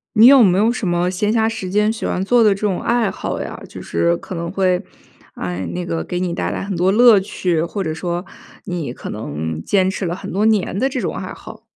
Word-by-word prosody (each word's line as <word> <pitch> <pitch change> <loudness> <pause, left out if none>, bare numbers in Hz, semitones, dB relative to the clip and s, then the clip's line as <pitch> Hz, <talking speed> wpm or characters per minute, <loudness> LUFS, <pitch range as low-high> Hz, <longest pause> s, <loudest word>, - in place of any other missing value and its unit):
你 220 +3 +8
有 270 -2 +8
没 185 -2 +4
有 225 +3 +3
什 225 -6 -3
么 175 +1 +1
闲 205 +3 0
暇 220 -1 +2
时 220 -5 -5
间 210 +2 +2
喜 225 - -6
欢 185 - -1
做 240 +4 +4
的 210 -3 +5
这 195 - -9
种 200 -4 0
爱 235 -3 +1
好 - - -4
呀？ - - -6
就 - - -10
是 85 0 0
可 185 - -8
能 170 0 -4
会， 185 -1 +1 0.5
哎， 90 0 -4
那 90 0 -3
个 85 -1 -2
给 175 - -4
你 180 -1 -1
带 - - -2
来 - - -3
很 200 0 -4
多 180 +2 +2
乐 225 0 +6
趣， 180 -4 -1
或 195 +4 -3
者 155 - -2
说 175 +2 -3 0.4
你 175 -9 -4
可 - - -8
能 80 -5 -4
坚 190 - +2
持 190 -1 -3
了 170 - -2
很 - - -7
多 200 +3 +1
年 210 -4 +1
的 265 - +2
这 260 -2 -3
种 - - -2
爱 - - -5
好。 - - -12
185 Hz, 265 characters per minute, -19 LUFS, 170-215 Hz, 0.5 s, 你